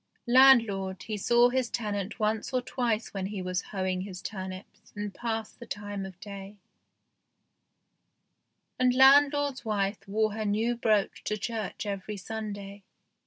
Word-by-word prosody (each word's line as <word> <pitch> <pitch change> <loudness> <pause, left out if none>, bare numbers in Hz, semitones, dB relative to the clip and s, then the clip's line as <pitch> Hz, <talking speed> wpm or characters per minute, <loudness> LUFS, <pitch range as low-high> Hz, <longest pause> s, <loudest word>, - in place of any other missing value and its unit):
Landlord, 230 -7 +5
he 220 - -4
saw 240 +4 +4
his 255 -1 0
tenant 210 -2 -3
once 215 0 0
or 255 - +2
twice 235 -3 -1
when 190 -1 -2
he 205 -1 -5
was 185 0 -2
hoeing 185 -2 -1
his 185 -2 -7
turnips 190 -1 -8
and 205 -1 -4
passed 225 -1 -4
the 235 - -10
time 205 -2 -5
of 185 -2 -13
day, 200 0 -9 2.2
and 250 -1 +3
landlord's 280 +1 +5
wife 205 -2 -1
wore 215 +1 +1
her 220 0 -3
new 220 +3 +1
brooch 215 -4 +1
to 210 - -1
church 215 -1 -4
every 200 +1 -4
Sunday. 205 -1 -6
210 Hz, 140 wpm, -28 LUFS, 195-235 Hz, 2.2 s, Landlord